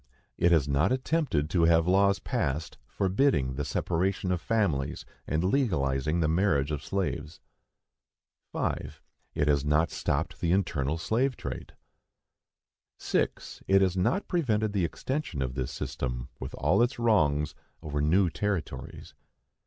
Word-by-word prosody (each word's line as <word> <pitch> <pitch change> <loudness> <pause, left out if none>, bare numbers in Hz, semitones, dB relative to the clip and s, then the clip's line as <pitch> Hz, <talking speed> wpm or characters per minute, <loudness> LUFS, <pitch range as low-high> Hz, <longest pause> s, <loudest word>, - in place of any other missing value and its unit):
It 85 - +3
has 80 -5 +4
not 70 - +2
attempted 130 - 0
to 85 -2 +3
have 80 0 +4
laws 100 +1 +4
passed 75 -1 -3
forbidding 95 - +1
the 70 +3 -3
separation 90 +7 -1
of 90 -2 -1
families 85 -10 0 0.2
and 80 +3 0
legalizing 80 - +1
the 80 - +2
marriage 80 -4 +2
of 75 -2 -3
slaves. 85 -3 -3 1.1
5. - - -3 0.4
It 75 - +1
has 70 -2 +3
not 75 +3 +2
stopped - - -2
the 85 0 +2
internal 80 -6 0
slavetrade. 125 +10 -2 1.2
6. - - -2
It 95 0 +5
has 95 -1 +1
not 165 - 0
prevented 110 - 0
the 95 -4 +1
extension 130 - -3
of 65 -1 -3
this 65 -2 -3
system, 60 -1 -4
with 65 - -6
all - - +2
its 120 +2 +1
wrongs, 75 -11 +2 0.3
over 75 -2 -2
new 90 +6 +3
territories. 105 -3 -4
85 Hz, 135 wpm, -28 LUFS, 75-100 Hz, 1.2 s, It